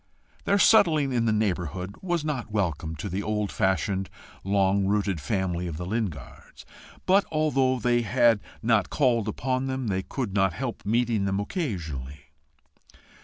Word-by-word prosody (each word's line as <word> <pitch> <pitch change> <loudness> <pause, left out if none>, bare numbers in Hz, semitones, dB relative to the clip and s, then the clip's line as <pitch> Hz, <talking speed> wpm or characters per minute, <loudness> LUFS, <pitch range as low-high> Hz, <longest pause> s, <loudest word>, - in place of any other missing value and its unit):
Their 200 - +3
settling 165 - +4
in 120 -2 +1
the 110 - +2
neighbourhood 95 -3 -2
was 175 -4 -1
not 140 -7 -3
welcome 85 -6 -2
to 75 - -5
the 95 +1 -3
old 105 0 -2
fashioned, 95 0 0 0.3
long 95 0 +2
rooted 100 -5 0
family 90 -4 -1
of 80 -3 -5
the 90 - -5
Lingards; 95 - -5 0.4
but 195 +2 +4
although 135 -4 +2
they 120 0 +2
had 120 0 +3 0.2
not 110 -4 +2
called 120 -6 +1
upon 130 +4 -1
them, 130 -3 -2
they 95 -1 0
could 115 0 -4
not 95 -3 +2
help 125 +1 -5
meeting 115 -2 +1
them 95 0 0
occasionally. 80 - -5
105 Hz, 150 wpm, -26 LUFS, 95-130 Hz, 0.4 s, settling